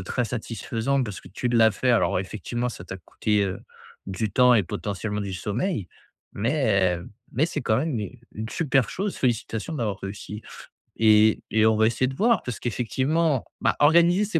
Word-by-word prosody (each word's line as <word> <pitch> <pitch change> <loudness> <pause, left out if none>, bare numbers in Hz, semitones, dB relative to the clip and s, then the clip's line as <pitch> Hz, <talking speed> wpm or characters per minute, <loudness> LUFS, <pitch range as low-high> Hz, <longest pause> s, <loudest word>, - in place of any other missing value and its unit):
très 120 +6 -2
satisfaisant 120 +3 -2
parce 105 -5 -5
que - - -14
tu 125 - -3
l'as 115 -2 +5
fait, 125 +4 0
alors 115 -5 +2
effectivement, 120 +5 -3
ça 90 - -9
t'as 95 +1 -7
coûté, 105 +3 -1
heu, 95 -1 -4 0.5
du 100 +2 -2
temps 125 +1 +6
et 105 - +4
potentiellement 105 +2 -4
du 100 -2 -4
sommeil. 105 - -2 0.5
Mais 100 - +1 0.3
mais 150 +7 +2
c'est - - -3
quand 110 -1 +2
même 145 -5 -1
u 115 +4 -6
une 110 +1 -5
super 135 -2 +1
chose, 195 +1 -3
félicitations 120 +2 -1
d'avoir 110 -8 -2
réussi. 105 +2 -7 0.6
Et 110 -1 +5
et 110 0 +3
on 110 0 +4
va 110 0 +4
essayer 120 +3 +1
de 135 - -5
voir, 230 - +2
parce 125 - -5
qu'effectivement, 130 +5 0 0.2
bah, - - +2
organiser 170 +6 +5
ces 175 -5 0
115 Hz, 180 wpm, -25 LUFS, 105-135 Hz, 0.6 s, temps